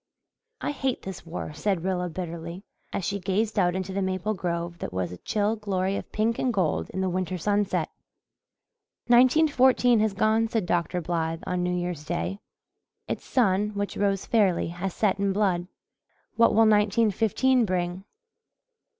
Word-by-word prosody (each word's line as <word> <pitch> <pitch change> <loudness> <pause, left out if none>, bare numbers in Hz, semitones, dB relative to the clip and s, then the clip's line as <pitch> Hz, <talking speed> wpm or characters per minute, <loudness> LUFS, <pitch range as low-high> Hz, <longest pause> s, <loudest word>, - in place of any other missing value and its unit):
"I - - -1
hate 265 -3 -2
this 190 -3 -8
war," 165 -2 -5
said 170 +2 -1
Rilla 180 -1 -1
bitterly, 170 +1 -6 0.3
as 190 - -3
she 200 - -2
gazed 205 +3 0
out 175 -1 +2
into 190 0 -3
the 195 - -1
maple 190 +2 -1
grove 170 -2 -3
that - - -5
was 90 -1 -2
a 90 - -7
chill 210 - 0
glory 195 -3 -1
of - - -6
pink 225 +2 0
and 255 - +1
gold 185 -8 0
in 190 - -3
the 190 - +1
winter 185 0 -2
sunset. 205 +3 0 1.2
"Nineteen 255 +6 +6
fourteen 250 -4 +4
has 215 -2 +1
gone," 220 +2 +2
said 225 -4 -1
Dr. 175 0 0
Blythe 165 -1 -2
on 180 -1 -1
New 180 0 0
Year's 175 -3 -3
Day. 175 +5 -3 0.7
"Its - - -4
sun, 210 -3 +1
which 200 0 -3
rose 200 -1 0
fairly, 200 -8 +2
has 175 +3 -4
set 200 -3 +1
in 200 -1 +1
blood. 185 -4 +1 0.7
What 230 - +4
will 225 +1 +6
nineteen 210 +1 +3
fifteen 240 +5 +2
bring?" 180 -2 -2
195 Hz, 165 wpm, -26 LUFS, 175-215 Hz, 1.2 s, Nineteen